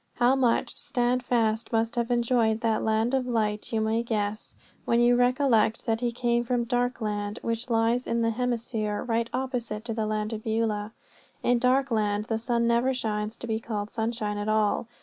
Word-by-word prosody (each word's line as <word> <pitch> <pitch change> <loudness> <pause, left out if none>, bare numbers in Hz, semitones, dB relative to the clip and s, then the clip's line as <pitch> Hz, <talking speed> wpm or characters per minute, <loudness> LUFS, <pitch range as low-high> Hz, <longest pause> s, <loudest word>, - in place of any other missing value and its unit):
How 245 +2 +4
much 250 -3 +1
Standfast 245 -4 0
must 225 +1 0
have 235 0 -1
enjoyed 235 -2 +2
that 225 -2 +1
land 220 +3 +1
of 260 -2 +1
light 215 -3 -1
you 225 - +1
may 220 +1 +1
guess 215 -2 -3 0.3
when 235 - +2
you 240 0 +5
recollect 245 -3 +2
that 225 0 0
he 240 -1 0
came 240 0 0
from 240 0 0
Darkland, 225 -4 -1
which 230 +2 -2
lies 230 +2 +1
in 230 0 0
the 230 - +2
hemisphere 230 -3 -2
right 230 -1 -1
opposite 240 -5 -3
to 230 - -3
the 220 -1 -1
land 215 +1 -2
of 215 0 -5
Beulah. 220 -1 -1 0.5
In 245 -1 +3
Darkland 230 -5 +1
the 225 -1 0
sun 235 0 0
never 235 +3 +2
shines 215 -2 -2
to - - -8
be 220 -1 -1
called 210 -2 -4
sunshine 220 -2 -2
at 205 +1 -2
all. 215 +1 +1
230 Hz, 180 wpm, -27 LUFS, 220-245 Hz, 0.5 s, you